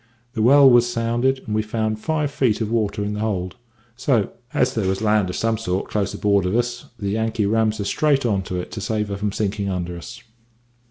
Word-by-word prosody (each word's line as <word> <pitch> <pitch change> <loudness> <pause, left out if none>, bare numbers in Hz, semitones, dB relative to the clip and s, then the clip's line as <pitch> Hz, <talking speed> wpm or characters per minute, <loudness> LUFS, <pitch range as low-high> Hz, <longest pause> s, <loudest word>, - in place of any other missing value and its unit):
The 110 - -2
well 140 +4 +7
was 120 -1 +5
sounded, 120 +3 0
and 105 - -4
we 110 - +2
found 110 0 -2
five 150 +3 -1
feet 125 -7 +1
of 110 -1 -2
water 105 -3 0
in 105 - -2
the 105 - -4
hold; 95 -4 -2 0.4
so, 125 -4 +1 0.2
as 130 +1 +1
there 105 -4 -1
was 95 0 0
land 105 -3 +2
of 90 - -4
some 115 -1 0
sort 95 -3 -2
close 105 -3 0
aboard 100 -3 +1
of 95 - -1
us, 120 0 -1
the 100 - -3
Yankee 110 0 0
rams 110 +1 +1
her 105 - -3
straight 140 +5 +1
on 100 -4 +1
to 90 - -2
it 90 - -7
to 110 - -5
save 105 0 -2
her 100 - -3
from 105 0 -1
sinking 100 -1 -2
under 90 -2 -3
us. 85 - -10
110 Hz, 225 wpm, -22 LUFS, 100-120 Hz, 0.4 s, well